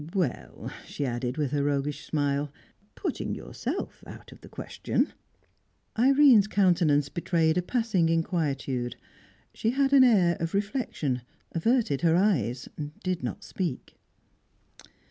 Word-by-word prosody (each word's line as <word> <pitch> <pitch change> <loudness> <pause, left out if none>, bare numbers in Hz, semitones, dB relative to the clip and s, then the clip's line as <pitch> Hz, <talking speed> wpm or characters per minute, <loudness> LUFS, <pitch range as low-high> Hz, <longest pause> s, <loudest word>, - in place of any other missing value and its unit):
Well," 130 - -2
she 145 - -4
added, 125 +1 -2
with 145 -4 -1
her 145 -1 +1
roguish 145 0 -1
smile, 145 -1 0 0.4
"putting - - -3
yourself - - -5
out - - -11
of - - -15
the - - -13
question." - - -2 0.8
Irene's 260 -3 +6
countenance 175 -8 +3
betrayed 165 0 +1
a 180 - +2
passing 195 -4 +1
inquietude. 140 -7 -1 0.6
She 225 - -1
had 270 +2 +2
an 270 -2 +8
air 185 -9 +4
of 165 +2 -2
reflection; 200 - -1 0.3
averted 210 - +1
her 165 -1 +4
eyes; 135 - +1 0.4
did 180 -2 -1
not - - -4
speak. 175 -9 -4
165 Hz, 125 wpm, -27 LUFS, 140-205 Hz, 0.8 s, an